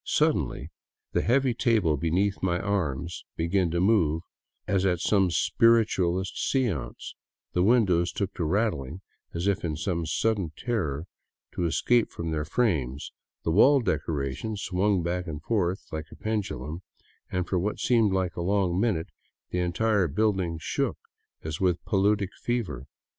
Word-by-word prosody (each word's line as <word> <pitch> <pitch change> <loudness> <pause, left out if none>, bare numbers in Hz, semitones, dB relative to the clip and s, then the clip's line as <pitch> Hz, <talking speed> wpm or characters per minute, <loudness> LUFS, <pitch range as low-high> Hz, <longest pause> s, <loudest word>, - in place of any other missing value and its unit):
Suddenly 75 +7 0 0.4
the - - +1
heavy 130 +1 +2
table 110 -10 +2
beneath 90 +7 0
my 90 -1 +1
arm 85 -9 -1 0.3
began 85 +2 +1
to 85 +2 -1
move 85 -5 +2 0.4
as 95 -2 +1
at 90 -3 +2
some 95 0 +3
spiritualist 95 -3 +2
seance, 115 - -2 0.4
the 90 - +2
windows 90 -5 +3
took 100 +2 -3
to 85 - -3
rattling 85 - -1 0.3
as 85 +2 -2
if 100 -1 +1
in 80 -3 -1
some 85 -1 -2
sudden 100 -3 0
terror 85 - -2 0.5
to 90 - -2
escape 120 +7 +2
from 85 -1 -5
their 75 -1 -1
frames, 75 - -1 0.3
the 80 - 0
wall 135 - +6
decorations 75 - -2
swung 95 0 +1
back 90 +1 -2
and 75 -1 -6
forth 95 -3 0
like 80 0 -5
pendu 110 -2 -2
lums, 80 +4 -6 0.5
and 90 -1 -1
for 95 - 0
what 105 +4 -2
seemed 115 -5 +3
a 95 -2 -1
long 95 -1 +1
minute 100 -7 0 0.4
the 90 - -1
entire 95 +2 +1
building 95 -1 0
shook - - -1 0.5
as 80 +2 -5
with 90 -2 +3
a - - -16
paludic 100 -1 +2
fever. 95 - -2
90 Hz, 150 wpm, -27 LUFS, 80-105 Hz, 0.5 s, wall